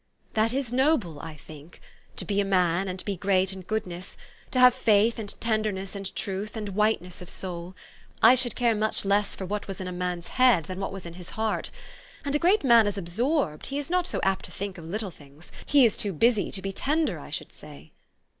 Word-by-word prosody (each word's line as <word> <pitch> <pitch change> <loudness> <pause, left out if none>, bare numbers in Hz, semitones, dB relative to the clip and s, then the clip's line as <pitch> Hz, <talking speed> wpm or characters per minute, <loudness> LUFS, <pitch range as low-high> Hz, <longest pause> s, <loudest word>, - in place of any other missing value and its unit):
That 220 0 +2
is 255 -2 -2
noble, 250 - +2
I 160 +1 -8
think, 150 +2 -13 0.4
to - - -2
be 205 -1 +1
a - - +1
man, 185 -1 +2
and 185 0 -5
be 200 - -2
great 190 0 +1
in 190 - -8
goodness; 185 -2 -5 0.3
to - - -3
have 250 -1 +8
faith 220 +1 +3
and 205 -2 -6
tenderness 215 -4 -1
and 195 -1 -5
truth, 200 +3 -3
and 210 -2 -4
whiteness 195 -3 0
of 180 - -9
soul. 180 -1 -5 0.4
I - - +8
should 255 -2 +2
care 240 -2 +2
much 215 -1 0
less 200 +1 +2
for 190 - -5
what 205 +2 -4
was 195 -2 -6
in 185 - -4
a - - -4
man's 180 -1 -3
head 250 -10 +4
than 185 +4 -7
what 195 - -3
was 190 -2 -7
in 170 - -7
his 175 0 -7
heart. 220 0 -1 0.6
And 285 0 0
a - - +3
great 370 +4 +3
man 235 -4 +6
is 205 0 -2
absorbed: 195 - 0
he 275 - -3
is 290 +3 -4
not 360 -1 +2
so - - 0
apt 195 -1 +1
to - - -12
think 195 -2 -5
of 165 - -10
little 200 +3 -3
things; 145 +1 -13 0.2
he 280 -3 +6
is 220 - +2
too 200 -2 -1
busy 220 +5 +2
to 190 - -3
be 195 - -2
tender, 300 +10 0
I - - -10
should - - -5
say." - - -12
200 Hz, 225 wpm, -26 LUFS, 180-230 Hz, 0.6 s, have